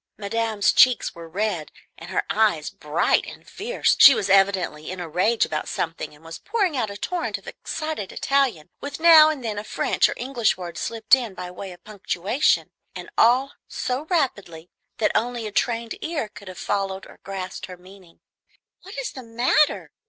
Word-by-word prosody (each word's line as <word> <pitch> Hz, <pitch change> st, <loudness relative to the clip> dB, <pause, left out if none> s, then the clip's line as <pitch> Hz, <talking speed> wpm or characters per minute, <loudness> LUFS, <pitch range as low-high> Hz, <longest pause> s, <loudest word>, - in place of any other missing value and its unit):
Madame's 215 Hz, 0 st, 0 dB
cheeks 255 Hz, -2 st, +4 dB
were 165 Hz, -1 st, -11 dB
red, 185 Hz, -3 st, -2 dB, 0.2 s
and 165 Hz, -, -11 dB
her 185 Hz, -, 0 dB
eyes 205 Hz, -8 st, +1 dB
bright 150 Hz, +2 st, +1 dB
and -, -, -12 dB
fierce; 480 Hz, +5 st, 0 dB
she 275 Hz, -, +10 dB
was 195 Hz, -, -1 dB
evidently 190 Hz, -6 st, +2 dB
in 185 Hz, 0 st, -6 dB
a 175 Hz, -, -5 dB
rage 190 Hz, +8 st, +2 dB
about 155 Hz, -, -4 dB
something, 160 Hz, -2 st, -4 dB
and 155 Hz, +2 st, -21 dB
was 165 Hz, 0 st, -8 dB
pouring 410 Hz, -7 st, -1 dB
out 225 Hz, -5 st, -1 dB
a 200 Hz, -, -7 dB
torrent 355 Hz, +9 st, -3 dB
of -, -, -18 dB
excited 310 Hz, -11 st, -5 dB
Italian, 255 Hz, -, 0 dB
with 285 Hz, -, -6 dB
now 320 Hz, -2 st, +8 dB
and 285 Hz, -6 st, -4 dB
then 210 Hz, -2 st, -2 dB
a -, -, -6 dB
French -, -, +1 dB
or -, -, -4 dB
English 245 Hz, -6 st, 0 dB
word 175 Hz, -2 st, -7 dB
slipped 225 Hz, +7 st, -2 dB
in 240 Hz, -7 st, +4 dB
by 180 Hz, 0 st, -7 dB
way 190 Hz, +1 st, -8 dB
of 175 Hz, -, -14 dB
punctuation, 210 Hz, -, 0 dB, 0.2 s
and -, -, -8 dB
all 255 Hz, +4 st, +3 dB
so 255 Hz, +4 st, -3 dB
rapidly 200 Hz, -, -2 dB, 0.3 s
that 215 Hz, -, +1 dB
only 235 Hz, +1 st, -1 dB
a 210 Hz, -, -5 dB
trained 230 Hz, +1 st, -1 dB
ear 320 Hz, -8 st, -2 dB
could 205 Hz, -1 st, -13 dB
have 185 Hz, -1 st, -9 dB
followed 195 Hz, -1 st, -2 dB
or -, -, -16 dB
grasped 190 Hz, -1 st, -6 dB
her 180 Hz, -1 st, -10 dB
meaning. 185 Hz, -1 st, -17 dB, 0.6 s
"What 385 Hz, +6 st, -11 dB
is -, -, -3 dB
the 260 Hz, -, -9 dB
matter?" 240 Hz, +5 st, +1 dB
210 Hz, 185 wpm, -23 LUFS, 180-260 Hz, 0.6 s, she